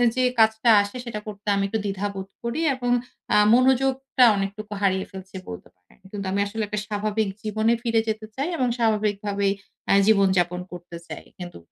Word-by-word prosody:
যে 255 Hz, -, +2 dB, 0.2 s
কাজটা 220 Hz, +1 st, +4 dB
আসে 205 Hz, +4 st, -5 dB
সেটা 215 Hz, -3 st, -4 dB
করতে 205 Hz, 0 st, -9 dB
আমি 200 Hz, -, +1 dB
একটু 220 Hz, +2 st, -2 dB
দ্বিধা 200 Hz, +1 st, -2 dB
বোধ 190 Hz, 0 st, -6 dB
করি 235 Hz, +7 st, -2 dB
এবং 245 Hz, -1 st, -2 dB, 0.4 s
আ -, -, +6 dB, 0.2 s
মনোযোগটা 265 Hz, +1 st, +3 dB
অনেকটুকু 205 Hz, +2 st, -4 dB
হারিয়ে 190 Hz, -1 st, +1 dB
ফেলছি 190 Hz, -1 st, -10 dB
বলতে 90 Hz, -, -9 dB
পারেন। 90 Hz, 0 st, -27 dB
কিন্তু 200 Hz, -2 st, -5 dB
আমি 200 Hz, -, 0 dB
আসলে 220 Hz, +2 st, -3 dB
একটা 210 Hz, 0 st, -3 dB
স্বাভাবিক 210 Hz, 0 st, -1 dB
জীবনে 220 Hz, +2 st, +1 dB
ফিরে 230 Hz, -2 st, +2 dB
যেতে 215 Hz, 0 st, -2 dB
চাই 280 Hz, +6 st, -2 dB
এবং 255 Hz, -3 st, +1 dB
স্বাভাবিকভাবেই 205 Hz, -3 st, 0 dB, 0.3 s
অ্যা -, -, +4 dB
জীবন-যাপন 190 Hz, -4 st, +3 dB
করতে 175 Hz, -1 st, -9 dB
চাই। -, -, -8 dB
কিন্তু 175 Hz, -1 st, -8 dB
210 Hz, 175 wpm, -24 LUFS, 195-230 Hz, 0.4 s, আ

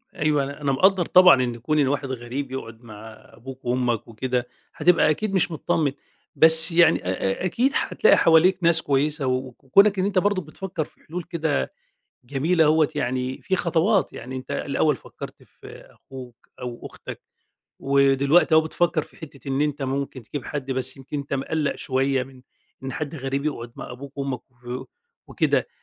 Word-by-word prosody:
أيوه، 150 Hz, -2 st, +1 dB
أنا 140 Hz, +2 st, -7 dB
أنا 140 Hz, -1 st, 0 dB
مقدّر 185 Hz, +5 st, +3 dB
طبعًا 180 Hz, -8 st, +6 dB
إن 120 Hz, -1 st, -3 dB
كُون 150 Hz, +6 st, -1 dB
إن 140 Hz, -, +3 dB
واحد 140 Hz, +1 st, -1 dB
غريب 130 Hz, +2 st, -5 dB
يقعُد 115 Hz, -4 st, -7 dB
مع 110 Hz, -1 st, -11 dB, 0.2 s
أبوك 130 Hz, +3 st, -11 dB
وأمك 120 Hz, -2 st, -1 dB
وكده، 125 Hz, +2 st, -3 dB, 0.3 s
هتبقى 175 Hz, -3 st, +4 dB
أكيد 195 Hz, +7 st, -1 dB
مش 180 Hz, -2 st, +2 dB
متطمّن، 155 Hz, -2 st, 0 dB, 0.4 s
بس 160 Hz, +1 st, +6 dB
يعني 170 Hz, -, +4 dB
آآ 90 Hz, -, 0 dB, 0.3 s
آآ -, -, 0 dB
أكيد 245 Hz, +9 st, +1 dB
هتلاقي 450 Hz, -, +3 dB
حواليك 170 Hz, +3 st, +5 dB
ناس 165 Hz, -1 st, +4 dB
كويسة 145 Hz, 0 st, 0 dB
و 130 Hz, -, +2 dB
وكُونك 195 Hz, -, +3 dB
إن 185 Hz, -, +1 dB
أنت 200 Hz, -2 st, +2 dB
برضه 205 Hz, 0 st, 0 dB
بتفكّر 170 Hz, +1 st, -5 dB
في -, -, -25 dB
حلول 175 Hz, +3 st, -5 dB
كده 160 Hz, -, -2 dB, 0.5 s
جميلة 155 Hz, +6 st, +1 dB
أهوّة 155 Hz, 0 st, +3 dB
يعني 130 Hz, +1 st, -3 dB
في 190 Hz, -, 0 dB
خطوات، 180 Hz, +4 st, +1 dB
يعني 130 Hz, +2 st, -8 dB
أنت 130 Hz, 0 st, -8 dB
الأول 150 Hz, +1 st, 0 dB
فكّرت -, -, -11 dB
في -, -, -14 dB
أخوك 125 Hz, -3 st, -13 dB
أو 120 Hz, -1 st, -7 dB
أختك -, -, -10 dB, 0.6 s
ودلوقتي 140 Hz, +4 st, +3 dB
أهو 160 Hz, -, +7 dB
بتفكّر 160 Hz, +1 st, 0 dB
في -, -, -15 dB
حتّة 145 Hz, -3 st, -12 dB
إن 135 Hz, +1 st, 0 dB
أنت 150 Hz, -1 st, -1 dB
ممكن 135 Hz, -1 st, -3 dB
تجيب 130 Hz, +3 st, -7 dB
حد 135 Hz, -2 st, -4 dB
بس 130 Hz, 0 st, -1 dB
يمكن 135 Hz, +2 st, -7 dB
أنت 140 Hz, 0 st, -5 dB
مقلَّق 140 Hz, +2 st, -1 dB
شوية 135 Hz, 0 st, 0 dB
من 130 Hz, 0 st, -16 dB, 0.4 s
إن 135 Hz, -, -4 dB
حد 155 Hz, +2 st, -5 dB
غريب 135 Hz, 0 st, -3 dB
يقعُد 120 Hz, -6 st, -4 dB
مع -, -, -8 dB
أبوك 140 Hz, +3 st, -11 dB
وأمك 135 Hz, -3 st, -3 dB
و 125 Hz, +1 st, -8 dB, 0.4 s
وكده، -, -, 0 dB
140 Hz, 175 wpm, -23 LUFS, 130-160 Hz, 0.6 s, أهو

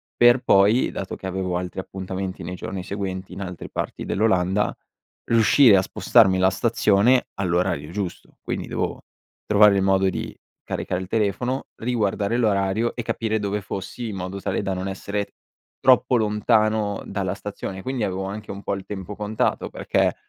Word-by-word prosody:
per 120 Hz, +1 st, +6 dB
poi, 105 Hz, +4 st, +4 dB
dato 95 Hz, -, -5 dB
che -, -, -11 dB
avevo 95 Hz, -1 st, -2 dB
altri 90 Hz, +1 st, -5 dB
appuntamenti 95 Hz, -1 st, -5 dB
nei 90 Hz, +2 st, -5 dB
giorni 95 Hz, +1 st, -5 dB
seguenti 95 Hz, -1 st, -5 dB
in 95 Hz, -, -7 dB
altre 90 Hz, -2 st, -6 dB
parti -, -, -4 dB
dell'Olanda, 95 Hz, -1 st, +1 dB, 0.5 s
riuscire 115 Hz, 0 st, +6 dB
a 95 Hz, -, +4 dB
spostarmi 95 Hz, 0 st, +4 dB
la 95 Hz, 0 st, +5 dB
stazione 110 Hz, +3 st, +3 dB
all'orario 90 Hz, -5 st, -1 dB
giusto. 100 Hz, -4 st, -5 dB
Quindi -, -, -4 dB
dovevo -, -, -3 dB, 0.4 s
trovare 105 Hz, -1 st, +6 dB
il 95 Hz, -, +2 dB
modo 95 Hz, 0 st, +3 dB
di -, -, -4 dB, 0.3 s
caricare 90 Hz, 0 st, -3 dB
il 95 Hz, -, -6 dB
telefono, 115 Hz, +5 st, -1 dB
riguardare 110 Hz, -2 st, 0 dB
l'orario 105 Hz, 0 st, +1 dB
e 120 Hz, -, -3 dB
capire 110 Hz, -1 st, -1 dB
dove 100 Hz, 0 st, -1 dB
fossi 100 Hz, +5 st, -5 dB
in 105 Hz, -, -5 dB
modo 95 Hz, +2 st, -5 dB
tale -, -, -1 dB
da 95 Hz, -1 st, -1 dB
non 95 Hz, +1 st, -3 dB
essere 100 Hz, +1 st, -4 dB, 0.5 s
troppo 130 Hz, 0 st, +5 dB
lontano 110 Hz, -1 st, +1 dB
dalla 95 Hz, -3 st, -2 dB
stazione. 100 Hz, -2 st, -6 dB
Quindi 130 Hz, -3 st, -2 dB
avevo 95 Hz, 0 st, -3 dB
anche 105 Hz, +2 st, -6 dB
un 100 Hz, +1 st, -8 dB
po' -, -, -1 dB
il 95 Hz, -, -8 dB
tempo 100 Hz, 0 st, -6 dB
contato, 105 Hz, +1 st, -1 dB
perché -, -, 0 dB
100 Hz, 165 wpm, -23 LUFS, 95-110 Hz, 0.5 s, per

